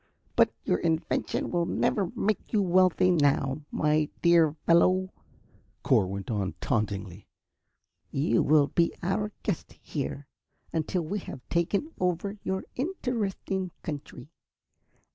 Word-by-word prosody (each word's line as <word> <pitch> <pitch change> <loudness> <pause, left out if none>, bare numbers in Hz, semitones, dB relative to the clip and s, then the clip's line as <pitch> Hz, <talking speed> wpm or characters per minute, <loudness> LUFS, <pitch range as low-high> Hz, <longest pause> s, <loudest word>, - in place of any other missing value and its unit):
"But - - +5
your 90 - +1
invention 160 -1 -1
will 170 -1 +1
never 195 -5 +1
make 215 0 -1
you 210 -3 +3
wealthy 185 0 +4
now, 145 -3 +2
my 150 0 +1
dear 165 -3 +5
fellow," 185 +2 +4 0.7
Cor 95 - +3
went 100 +3 -5
on, 100 -4 -1
tauntingly. 100 -4 -2 0.8
"You 135 -4 +2
will 150 -1 +5
be 170 +3 +1
our 205 +4 0
guest, 195 -7 -3
here, 145 -1 -4 0.5
until 165 +2 -1
we 200 +7 -3
have 130 -8 -9
taken 195 - 0
over 180 +3 -1
your 190 0 -2
interesting 225 - -2
country. 150 -3 -7
170 Hz, 120 wpm, -28 LUFS, 145-190 Hz, 0.8 s, But